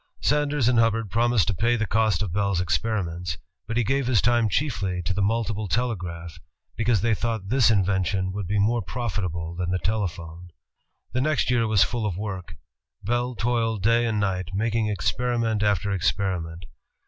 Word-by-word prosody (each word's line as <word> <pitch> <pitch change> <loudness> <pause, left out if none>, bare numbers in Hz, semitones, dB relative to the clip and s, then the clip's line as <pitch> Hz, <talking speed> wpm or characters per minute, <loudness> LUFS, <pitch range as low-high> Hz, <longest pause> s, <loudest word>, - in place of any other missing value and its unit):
Sanders 145 -3 +1
and 120 -2 +4
Hubbard 115 -3 +1
promised 120 -2 +2
to - - +1
pay 115 +7 +2
the 115 -1 0
cost 110 -3 +1
of 90 -5 -4
Bell's 100 -2 +1
ei^riments. 90 -2 -1 0.3
But 115 - -2
he 120 - +3
gave 135 +3 0
his 125 -5 +3
time 120 0 +3
chiefly 95 -7 -1
to 95 - -1
the 100 - -1
multiple 110 0 0
telegraph, 85 -7 -3 0.4
because 110 -3 +1
they 115 +1 +2
thought 110 -3 -2
this 125 -1 +4
in 100 -4 +3
vention 95 0 0
would 100 -1 -4
be 105 +2 0
more 115 +4 +2
profitable 90 -7 -3
than 90 0 -3
the 90 - +1
telephone. 90 -4 -3 0.6
The 130 - 0
next 150 -2 +1
year 115 -2 +2
was 110 -3 +4
full 115 -3 -1
of 90 -4 -3
work. 95 -3 -5 0.5
Bell 120 +3 -1
toiled 115 -3 0
day 115 +2 +3
and 110 -2 0
night, 95 -2 -2
making 110 +1 0
experiment 115 +3 0
after 100 -1 +1
experiment. 90 -2 -1
105 Hz, 175 wpm, -25 LUFS, 90-115 Hz, 0.6 s, and